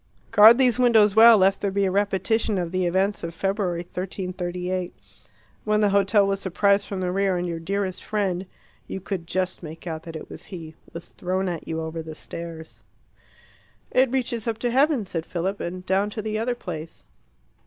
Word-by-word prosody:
Guard 220 +3 +8
these 255 -2 +3
windows 220 -5 +5
well, 225 0 +9
lest 195 0 +3
there 200 - 0
be 200 +1 +1
a 190 - 0
repetition 205 +2 +1
of 175 -2 -2
the 185 -1 0
events 190 +3 0
of 170 0 -5
February 195 -2 -1
1338, 180 0 -4 0.7
when 210 0 +1
the 205 -1 +3
hotel 200 +1 +4
was 195 0 0
surprised 200 +2 +2
from 195 -2 -4
the 180 -1 -1
rear, 195 -1 +1
and 175 0 -2
your 170 -1 -4
dearest 190 +2 -3
friend 195 -3 -2 0.4
you - - -5
could 185 -3 -5
just 185 0 -2
make 160 0 -9
out 160 -2 -4
that 165 0 -9
it 155 - -7
was - - -11
he 165 -4 -9 0.2
was 170 +1 -9
thrown 185 +1 -2
at 170 -3 -4
you 160 0 -3
over 160 +1 -4
the 160 -1 -8
stairs. 165 0 -9 1.1
"It 260 0 +4
reaches 245 -3 -2
up 225 -1 -1
to 245 - 0
heaven," 270 -3 +3
said 165 -3 -4
Philip, 185 +4 -3
"and 180 +1 -5
down 195 +2 +1
to 215 0 -6
the 215 0 -2
other 240 +2 -1
place." 165 -7 -7
190 Hz, 190 wpm, -24 LUFS, 175-210 Hz, 1.1 s, well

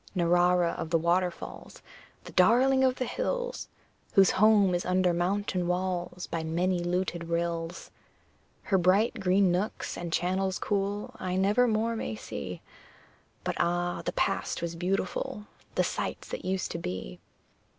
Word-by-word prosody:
Narrara 175 0 +3
of 160 - -4
the 165 - +3
waterfalls, 175 +2 -2 0.4
The - - -10
darling 255 +8 +4
of 260 -1 +3
the 255 - -2
hills, - - -3 0.5
Whose 195 -1 +6
home 205 -2 +5
is 175 - 0
under 185 -1 +2
mountain 180 0 0
walls 180 0 -2
By 165 -1 -3
many 175 +3 0
luted 175 0 -1
rills! 170 0 -3 0.7
Her 190 -3 +2
bright 200 +7 +3
green 190 -1 +3
nooks 190 +5 -2
and 170 -1 -5
channels 185 +2 0
cool 205 0 -2
I 185 0 -2
never 205 +6 +3
more 225 +1 +1
may 110 - -3
see; - - -7 0.8
But, - - -2
ah! 175 +1 0
the - - -2
Past - - 0
was 170 0 -3
beautiful 185 +3 -2 0.3
The - - +3
sights - - -3
that - - -6
used 190 0 -1
to 170 - -4
be. 90 - -5
180 Hz, 145 wpm, -29 LUFS, 175-200 Hz, 0.8 s, Whose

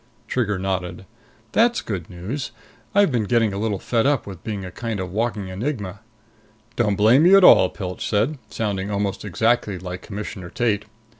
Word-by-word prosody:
Trigger 105 -6 0
nodded. 95 -1 -3 0.5
"That's 235 - +3
good 95 -7 -5
news. 100 +11 -5 0.5
I've 200 -5 +5
been 115 -4 0
getting 115 -2 +2
a 100 - -3
little 105 -2 -1
fed 115 +5 0
up 145 -3 +1
with 95 -4 -9
being 100 -3 -4
a 90 - -7
kind 115 +2 -4
of 90 -1 -4
walking 105 -2 -2
enigma." 100 -2 -4 0.8
"Don't 105 -4 +1
blame 115 +9 +5
you 195 +2 +8
at 195 - +5
all," 95 - +8
Pilch 90 -1 -5
said, 115 +8 +1
sounding 100 -3 -2
almost 100 -1 -2
exactly 110 0 +1
like 90 0 -6
Commissioner 100 -3 -7
Tate. 105 -1 0
105 Hz, 170 wpm, -22 LUFS, 95-120 Hz, 0.8 s, you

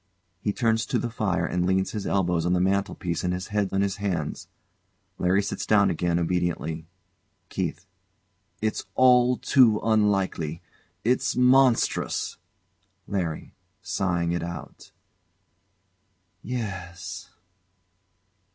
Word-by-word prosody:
He 105 - -1
turns 110 0 +1
to - - 0
the 120 - -2
fire 95 -6 0
and 90 0 -1
leans 95 0 +1
his 105 -3 -4
elbows 90 -4 +1
on 90 +1 +1
the 90 - +2
mantelpiece 95 -2 -1
and 90 0 0
his 90 - -6
head 105 -2 0
on 95 - +1
his 100 -1 -1
hands. 90 -7 -3 0.7
LARRY 95 +3 +2
Sits 100 - -3
down 100 -2 +4
again 85 +1 0
obediently. 85 -2 -1 0.6
KEITH. 90 -1 -3 0.8
It's 110 - -1
all 125 -1 +5
too 120 -6 +4
unlikely. 100 -7 +1 0.4
It's 125 +3 +1
monstrous! 125 -1 +3 0.7
LARRY. 85 -6 -3 0.3
[Sighing 85 -3 0
it 85 -1 -1
out] 85 0 -8 1.5
Yes. 95 -6 -6
95 Hz, 115 wpm, -26 LUFS, 85-110 Hz, 1.5 s, all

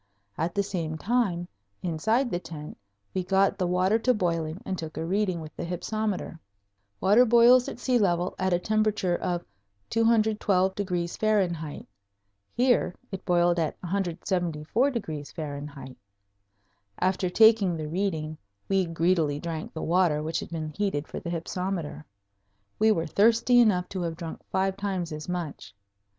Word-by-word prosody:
At 165 +2 -2
the 200 - +2
same 165 -5 -3
time, 195 -4 0 0.4
inside 220 - +1
the 175 - 0
tent 160 -3 -8 0.4
we 185 - -1
got 195 +2 +2
the 180 - +1
water 185 +5 +2
to 250 +2 +2
boiling 165 -3 -1
and 190 - -2
took 160 -3 -7
a 160 - -2
reading 185 -1 0
with 155 -1 -10
the - - -5
hypsometer. 185 +1 -3 0.6
Water 210 - +6
boils 240 +1 +6
at - - -7
sea 245 0 +1
level 180 -3 +1
at 185 0 +1
a 175 - +4
temperature 215 -2 +1
of 175 -1 -2 0.5
212° 195 -5 +1
F. - - -17 0.7
Here 245 -7 +2 0.2
it 195 - -6
boiled 175 -1 +3
at 160 -2 -2
174° 160 - -2
F. - - -15 1.0
After 185 0 +1
taking 215 -3 +5
the 155 -1 -4
reading 160 -3 -2 0.3
we 195 -1 +2
greedily 165 -3 +1
drank 165 -1 -5
the 160 - -5
water 170 -3 +2
which 160 +1 -1
had - - -7
been 160 -2 -4
heated 160 -4 -2
for - - -6
the 170 - -6
hypsometer. 175 -1 -3 0.8
We 220 +1 +5
were 165 -6 +1
thirsty 230 +7 +4
enough 190 -6 +4
to 190 - -4
have 165 -2 -3
drunk 165 -2 -7
five 190 0 0
times 190 -4 -2
as 155 +2 -6
much. 160 - -5
180 Hz, 145 wpm, -27 LUFS, 165-205 Hz, 1.0 s, Water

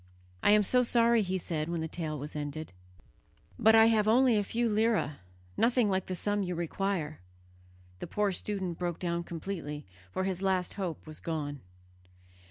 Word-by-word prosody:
"I - - +4
am 210 0 +5
so 250 +5 +3
sorry," 235 -1 +4
he 190 -1 -1
said 160 -3 -3
when 170 -1 -2
the 160 - -2
tale 155 -2 -3
was 145 +2 -7
ended, 150 -3 -5 0.9
"but 220 +1 +6
I 225 0 +8
have 220 -2 +3
only 245 +2 +5
a 205 - +2
few 235 +4 0
lire, 215 -9 +1 0.4
nothing 235 -3 +3
like 190 0 0
the 185 - -3
sum 205 +3 0
you 180 -2 -2
require." 170 -2 -2 0.8
The - - -5
poor 210 -1 0
student 185 -2 -3
broke 175 -2 -2
down 170 -1 -2
completely, 165 -4 -5 0.3
for 185 - -1
his 190 -1 -2
last 190 -2 0
hope 185 -5 -4
was 155 -1 -9
gone. 145 -4 -4
185 Hz, 175 wpm, -30 LUFS, 160-210 Hz, 0.9 s, I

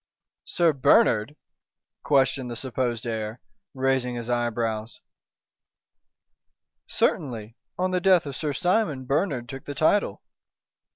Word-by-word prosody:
"Sir 170 -2 +2
Bernard?" 140 - +3 0.7
questioned 135 -2 +2
the 120 - -5
supposed 125 -1 -2
heir, 110 0 -4 0.4
raising 130 -2 0
his 120 0 -4
eyebrows. 115 -2 -2 1.9
"Certainly. 115 -5 -1 0.2
On 185 +1 0
the 180 -1 0
death 185 -3 +4
of 140 -2 -5
Sir 150 0 -2
Simon, 175 -5 0
Bernard 135 -3 0
took 135 0 -8
the 145 - -6
title!" 200 +6 +1
130 Hz, 110 wpm, -25 LUFS, 120-150 Hz, 1.9 s, death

